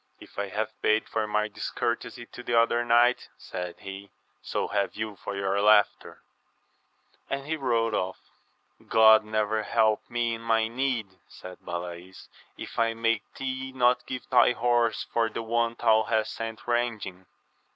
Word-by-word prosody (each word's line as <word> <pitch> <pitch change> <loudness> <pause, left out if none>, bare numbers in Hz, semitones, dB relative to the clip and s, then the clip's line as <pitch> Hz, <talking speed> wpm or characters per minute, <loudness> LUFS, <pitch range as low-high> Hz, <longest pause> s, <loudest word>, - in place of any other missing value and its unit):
If - - -11
I 100 - -1
have 110 +2 -4
paid 110 +1 +2
for 110 -1 -2
my 105 0 0
discourtesy 120 +3 -3
to 125 - -11
the 120 -1 +2
other 120 +1 +2
knight, 120 +1 +3
said 90 -1 -6
he, 100 +1 -8 0.3
so - - -2
have 100 -2 -1
you 110 -1 -4
for 100 - -6
your 100 0 0
laughter; 105 0 +3 0.5
— - - -39
^and 140 0 -3
he 160 +2 -1
rode 115 -6 0
off. 95 -2 -1 0.7
God 110 -1 +7
never 110 0 0
help 110 -1 +1
me 120 -1 0
in 115 - -6
my 115 -1 +2
need, 115 -6 -2
said 90 0 -11
Balays, 85 +1 -7 0.3
if - - -7
I 115 0 +2
make 115 -2 -1
thee 130 0 -4
not 125 -1 +2
give 125 -1 -6
thy 125 -1 +6
horse 120 -2 +1
for 115 -1 0
the 115 - -5
one 115 +1 0
thou 110 -2 +4
hast 110 0 0
sent 115 0 -6
ranging 115 -6 -2
115 Hz, 160 wpm, -27 LUFS, 105-120 Hz, 0.7 s, God